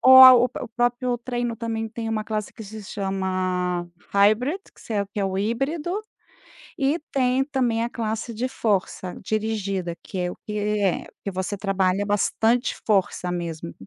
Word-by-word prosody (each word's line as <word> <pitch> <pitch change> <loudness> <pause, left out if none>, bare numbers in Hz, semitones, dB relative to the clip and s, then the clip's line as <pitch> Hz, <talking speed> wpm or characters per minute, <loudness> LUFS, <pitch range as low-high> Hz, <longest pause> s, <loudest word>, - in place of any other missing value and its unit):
ou 260 0 +9
a 260 0 +13
o 245 -1 +5
o 250 -1 -4
próprio 240 +1 0
treino 240 -1 -2
também 225 -1 -3
tem 225 0 -5
uma 220 -1 -1
classe 215 -1 -3
que 220 - -9
se 215 +1 -8
chama 185 -3 -1 0.3
hybrid, 215 - +4
que - - -20
se - - -7
é 200 -1 +1
que - - -5
é - - +1
o 190 -1 -1
híbrido, 280 - -1 0.8
e 280 +3 +2
tem 260 0 +2
também 250 -5 0
a 235 - -3
classe 225 0 -3
de 245 +4 -1
força 195 -6 -1
dirigida, 200 -4 -1
que 190 - -6
é 180 0 0
o - - -11
que 210 0 -3
é 205 -3 +1 0.2
que 200 - -3
você 190 +2 -3
trabalha 195 0 +1
bastante 225 +4 +2
força 190 -3 +1
mesmo. 170 - -4
215 Hz, 175 wpm, -24 LUFS, 195-240 Hz, 0.8 s, a